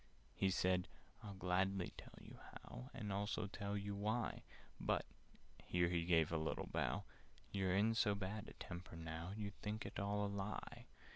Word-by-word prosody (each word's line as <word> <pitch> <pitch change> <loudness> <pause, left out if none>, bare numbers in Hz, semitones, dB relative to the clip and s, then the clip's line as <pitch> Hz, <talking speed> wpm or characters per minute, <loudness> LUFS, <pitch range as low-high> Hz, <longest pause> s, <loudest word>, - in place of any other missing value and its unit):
He 95 - +3
said 90 -1 +3 0.4
"I'd 100 -2 -6
gladly 95 +1 +2
tell - - -10
you - - -11
how, 125 - -7
And 105 -6 -3
also 105 +1 0
tell 100 0 -2
you 100 0 -2
why; 110 +3 0 0.4
But" - - +2 0.6
(here 85 -1 +3
he 85 -1 +2
gave 80 -3 +5
a 85 - +3
little 80 - 0
bow) - - 0 0.5
"You're 95 -2 +2
in 110 +3 +5
so 105 -2 +4
bad 100 +2 -3
a - - -8
temper 85 0 -6
now, 80 +2 -4
You'd 100 -2 -4
think 105 +1 -2
it - - -3
all 100 +1 +2
a - - +1
lie. 100 +1 -3
100 Hz, 170 wpm, -42 LUFS, 90-105 Hz, 0.6 s, gave